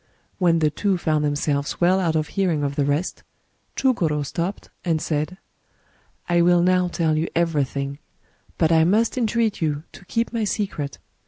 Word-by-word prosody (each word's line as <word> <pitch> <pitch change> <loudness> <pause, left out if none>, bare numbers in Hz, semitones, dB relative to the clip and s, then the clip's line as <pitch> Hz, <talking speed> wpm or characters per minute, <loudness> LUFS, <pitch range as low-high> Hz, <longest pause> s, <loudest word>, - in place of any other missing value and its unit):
When 170 -3 +4
the 155 -2 +2
two 195 +3 0
found 155 -3 0
themselves 145 -1 -1
well 180 +2 +4
out 165 -4 0
of 155 -1 0
hearing 175 -7 0
of 140 0 -2
the 145 -2 +1
rest, 145 +5 -1 0.5
Chugor5 165 - +1
stopped, 175 +7 -4
and 165 -3 +1
said: 155 +3 -2 0.3
— - - -38
" - - -40
I 175 -1 +3
will 175 0 +4
now 180 0 +3
tell 165 -3 0
you 160 +2 0
everything; 140 -4 -1 0.6
but 160 -1 +2
I 160 -1 +5
must 215 +7 +2
entreat 230 -4 0
you 150 -2 -1
to - - -14
keep 230 +5 -1
my 230 -2 0
secret. 190 - -2
165 Hz, 175 wpm, -23 LUFS, 150-185 Hz, 0.6 s, I